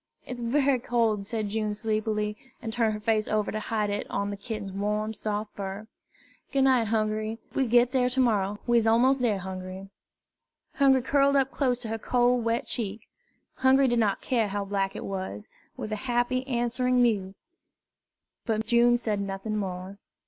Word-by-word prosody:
"It's 250 -1 -6
bery 265 +2 +2
cold," 225 -4 0
said 215 -3 -2
June 210 0 -1
sleepily, 215 -1 -1 0.2
and 225 -1 -5
turned 225 -2 +1
her - - -5
face 215 0 +1
over 215 -1 0
to 215 - -2
hide 210 -1 -1
it 205 - -3
on 200 0 -2
the - - -3
kitten's 205 -1 -6
warm, 210 +2 -1
soft 210 0 -4
fur. 200 +1 -5 0.7
"Goo' 275 -2 +2
night, 255 -4 +4
Hungry. 215 0 -1 0.2
We'll 265 - +1
git 240 +1 +4
dar 250 -2 +2
to 255 +1 -1
mor 235 -5 +4
rer. 195 +2 -3
We's 235 -2 +3
mos' 245 +4 +4
dar, 235 -6 +1
Hungry." 190 +1 -7 0.8
Hungry 270 -3 +4
curled 280 +1 +3
up 270 -1 +2
close 255 -4 +1
to 225 - -5
her 225 0 -3
cold, 245 +1 +2
wet 230 +1 0
cheek 215 -2 -3 0.6
Hungry 265 +1 +4
did 240 -1 +2
not 205 -3 +1
care 230 -4 +1
how 200 0 -3
black 195 -1 -1
it - - -5
was 195 +2 -5 0.3
with 215 - -5
a - - 0
happy 245 +2 0
answering 250 0 +1
mew; 205 -6 +1 1.1
but 220 -1 0
June 240 +1 +4
said 215 -4 -1
nothing 200 +2 -3
more. 190 -1 -4
220 Hz, 180 wpm, -27 LUFS, 205-245 Hz, 1.1 s, night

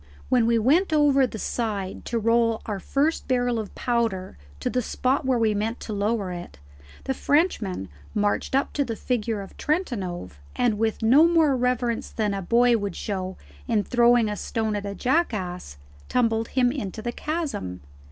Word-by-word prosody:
When 245 -3 +3
we 235 0 +3
went 305 - +3
over 285 -3 +4
the 225 - -7
side 205 -4 -3
to 235 - -1
roll 230 0 +2
our 205 -3 -3
first 285 - 0
barrel 245 -2 +1
of 210 -3 -6
powder 230 -6 -1 0.2
to - - -3
the 250 - 0
spot 260 +4 0
where 260 -2 +3
we 225 -2 +2
meant 220 +3 -2
to 215 - -5
lower 205 -1 -1
it, 175 - -8 0.5
the 265 - -1
Frenchman 265 - 0 0.3
marched 205 +4 0
up 275 - +1
to 285 - +1
the 235 -4 -4
figure 225 -3 -2
of 195 - -11
Trentanove, 190 - -2 0.2
and 225 -4 +1
with 225 0 0
no 275 +9 +6
more 320 -5 +4
reverence 245 -2 0
than 210 -2 -1
a 195 - -3
boy 235 +5 +4
would 200 -1 -4
show 190 -3 -4 0.3
in 210 - +2
throwing 240 -1 +4
a 210 - -2
stone 220 0 -2
at 205 0 -3
a 200 - -5
jackass, 195 - -1 0.3
tumbled 225 -2 +1
him 250 -2 +2
into 220 -5 -5
the 240 - -2
chasm. 280 - -4
230 Hz, 175 wpm, -25 LUFS, 205-255 Hz, 0.5 s, no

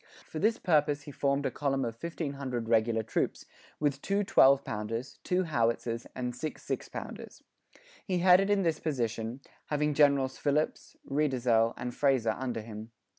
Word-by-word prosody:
For 155 - -5
this 220 +5 +2
purpose 150 -3 +2
he 145 - -9
formed 140 0 0
a - - 0
column 135 -2 -1
of 115 - -3
1,500 140 -8 -4
regular 115 0 +2
troops, 110 - -2 0.3
with 145 -2 0
two 200 +2 0
twelve 140 -9 +5
pounders, 115 +5 -4
two 185 +1 +1
howitzers 115 -5 -1
and 125 -1 -3
six 155 +5 -5
six - - -4
pounders. - - -8 0.6
He 185 -3 -1
headed 185 +2 +6 0.2
this 165 -3 0
in - - -26
person, 120 -4 -2 0.3
having 150 0 0
Generals 140 -3 +3
Phillips, 150 +1 -1
Reidesel, 125 -6 +2
and 125 0 -4
Fraser 130 -5 +2
under 125 -3 -3
him. 110 0 -8
135 Hz, 155 wpm, -30 LUFS, 115-150 Hz, 0.6 s, headed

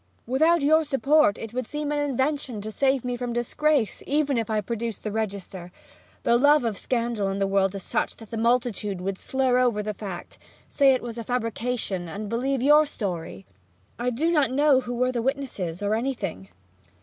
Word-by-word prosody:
Without 315 +6 +3
your 315 +2 +5
support 285 -4 +3
it 225 0 -7
would 250 -2 -3
seem 295 0 -3
an 295 - 0
invention 275 -3 -1
to 215 +1 -6
save 265 +1 +1
me 245 0 -1
from 245 -1 -4
disgrace; 245 0 0
even 290 -1 +1
if 230 -2 -1
I 215 -1 +1
produced 230 +2 -4
the 215 - -3
register, 195 -4 -4 0.5
the 235 0 +3
love 290 -1 +5
of 225 -3 -1
scandal 235 -5 -1
in 195 - -2
the 195 - +1
world 195 0 +1
is 195 - -5
such - - -1
that 225 -2 -14
the - - -4
multitude 230 -4 0
would 190 +1 -3
slur 260 -2 +1
over 235 -4 +2
the 210 0 -3
fact, 190 -3 -8 0.3
say 275 -2 +4
it - - -4
was 235 -1 -6
a - - -4
fabrication, 230 -6 -2
and 205 +3 -6
believe 255 +3 -1
your 300 +2 +6
story. 170 - -5 0.5
I 245 +1 0
do 300 +8 0
not 300 -5 +3
know 280 +1 +4
who 245 -1 -5
were 250 +1 +1
the 240 -2 -2
witnesses, 230 - -3
or 205 +1 +1
anything!' 215 - -3
240 Hz, 195 wpm, -25 LUFS, 210-270 Hz, 0.5 s, your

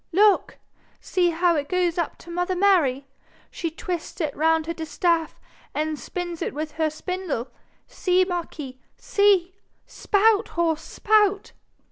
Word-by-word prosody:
'Look! 410 +3 +3 0.4
See 355 -2 +1
how 340 +1 +2
it 290 -2 -2
goes 360 -2 +1
up 335 - -2
to 340 - -9
mother 355 +2 -1
Mary. 340 -9 +3 0.5
She 335 - -3
twists 340 +2 -5
it 305 -4 -2
round 320 +1 +2
her 335 - -3
distaff 325 0 -1 0.4
and 310 -1 -1
spins 350 -2 -5
it - - -3
with 305 +1 -4
her 315 0 0
spindle. 345 -5 -4 0.4
See, 370 -1 +1
marquis, 320 -7 -5 0.2
see! 400 -6 +2 0.3
Spout, 425 +1 +2
horse, 325 -2 +1
spout.' 415 +2 +1
345 Hz, 135 wpm, -24 LUFS, 315-370 Hz, 0.5 s, Look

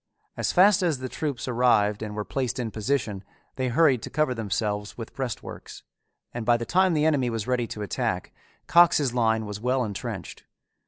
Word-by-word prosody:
As - - -1
fast 190 +2 +5
as 170 -6 +1
the 130 0 -5
troops 140 -1 -4
arrived 115 -4 +2
and 105 -1 -5
were 105 -1 -3
placed 130 -4 -2
in 120 -3 -3
position 110 -3 -2 0.3
they 130 -1 -1
hurried 135 -2 +3
to - - -6
cover 150 -2 +1
themselves 105 -1 -3
with 115 -2 -8
breastworks, 125 -6 -6 0.5
and 120 - -4
by 120 +1 +3
the 115 - -4
time 185 +2 +3
the 150 0 +2
enemy 140 -6 +2
was 115 -3 -3
ready 125 -2 0
to 105 - -6
attack, 100 - -2 0.3
Cox's 155 -6 +4
line 110 -2 +1
was 105 0 -6
well 125 +3 +1
intrenched. 105 -4 -6
120 Hz, 180 wpm, -26 LUFS, 110-140 Hz, 0.5 s, fast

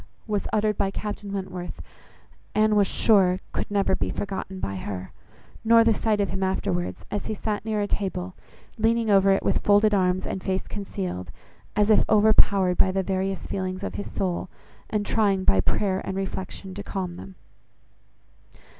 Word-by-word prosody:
was 210 -2 -2
uttered 210 -1 +1
by 195 - +2
Captain 205 0 -5
Wentworth, 185 -2 -5 0.8
Anne 215 0 +4
was 200 -2 +4
sure 185 -5 +3
could - - -3
never 200 -2 +1
be - - -2
forgotten 190 -1 -4
by 100 - -3
her; 95 0 -6 0.5
nor 230 0 +6
the 225 0 +4
sight 215 0 0
of 200 - 0
him 190 - -3
afterwards, 190 -2 -2
as 205 - -3
he 215 - -2
sat 210 0 -3
near 215 -1 0
a 205 - 0
table, 190 -2 -3 0.5
leaning 225 0 +2
over 195 0 +5
it 195 - +2
with - - +2
folded 205 +1 +4
arms 185 -1 +2
and 190 - -4
face 190 0 -1
concealed, 90 - -5 0.5
as 210 +1 +3
if 215 - +6
overpowered 205 -3 +4
by 190 - +4
the 190 0 0
various 190 0 -2
feelings 185 0 -3
of - - -3
his 205 - -5
soul, 180 -1 -2 0.4
and 210 -1 -1
trying 200 -4 +2
by 95 - +4
prayer 190 - 0
and 190 - -4
reflection 190 0 -5
to 205 - -6
calm 185 -3 -4
them. 190 - -10
195 Hz, 170 wpm, -25 LUFS, 185-210 Hz, 0.8 s, nor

